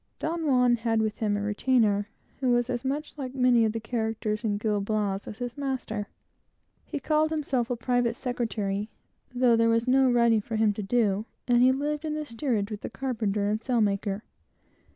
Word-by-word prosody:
Don 325 0 -2
Juan 250 -3 +4
had 225 -1 0
with 215 -1 -1
him 210 -2 0
a 205 - -3
retainer, 210 -1 +2 0.3
who 260 -2 +1
was 240 +1 +2
as 245 0 -3
much 290 +3 -3
like 260 -1 -5
many 250 -3 +4
of 220 - +1
the 225 - -3
characters 220 -1 -2
in 210 -2 0
Gil 210 -1 0
Blas 205 -1 -1
as 210 - -7
his 245 0 -5
master. 260 -7 -3 0.8
He 295 - -4
called 310 +1 +2
himself 280 -6 -1
a 245 - 0
private 245 -1 0
secretary, 220 -5 -2 0.4
though 245 -1 +3
there 230 0 +3
was 230 +1 +2
no 265 0 +4
writing 235 -2 +4
for 225 +2 -5
him 215 -1 +3
to 210 - -5
do, 210 -1 +1 0.2
and 240 -1 +4
he 255 +1 +6
lived 295 +3 -2
in 305 -1 -2
the 305 0 -3
steerage 230 -5 -2
with 210 - -5
the - - -5
carpenter 215 -4 -1
and 215 +2 0
sailmaker. 210 -4 0
235 Hz, 195 wpm, -27 LUFS, 215-255 Hz, 0.8 s, he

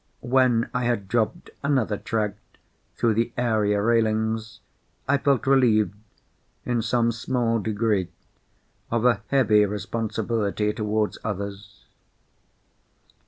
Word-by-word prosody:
When 125 -2 +3
I 125 -1 -1
had 120 -5 -1
dropped 110 +1 -1
another 130 -7 +1
tract 105 -1 -2 0.6
through 115 -2 +2
the 115 +2 0
area 110 -4 +1
railings, 110 -1 0 0.5
I 140 +1 +3
felt 140 -2 +1
relieved, 120 -7 +3 0.7
in 120 -2 0
some 115 +1 +1
small 115 -1 -1
degree, 105 -3 0 0.8
of 115 0 0
a 120 -5 +3
heavy 110 -6 +4
responsibility 105 +1 -2
towards 105 -1 -1
others. 100 0 -6
110 Hz, 105 wpm, -24 LUFS, 105-120 Hz, 0.8 s, heavy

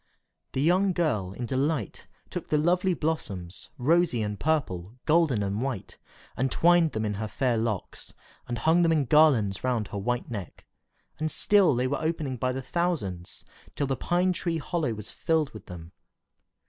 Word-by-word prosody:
The 130 - 0
young 185 +4 +3
girl, 125 - 0
in 120 - -5
delight, 135 -2 -2 0.2
took - - -5
the 150 - +2
lovely 180 +4 +2
blossoms, 100 - -4
rosy 150 -3 +2
and 105 -1 -4
purple, 110 - -1
golden 155 -9 +3
and 100 +2 -2
white, 130 -7 -4 0.4
and 130 0 0
twined 175 -2 +4
them 110 0 -1
in 105 - -1
her 110 +2 -3
fair 120 +3 0
locks, 110 -4 -3 0.4
and 120 - -3
hung 160 +9 +3
them 165 -1 +3
in 155 -4 +2
garlands 125 -9 +4
round 120 -5 0
her 100 - -4
white 120 +4 -2
neck; 100 -8 -7 0.5
and 155 0 0
still 195 -4 +4
they 125 +1 0
were 140 +2 -1
opening 155 -4 -2
by 130 +2 0
thousands, 130 - -2 0.3
till 145 - 0
the 135 -1 -1
pine 180 +7 +1
tree 170 -1 -2
hollow 155 -6 -2
was 105 0 -8
filled 160 -3 0
with 110 - -12
them. 85 -2 -9
130 Hz, 170 wpm, -27 LUFS, 110-160 Hz, 0.5 s, twined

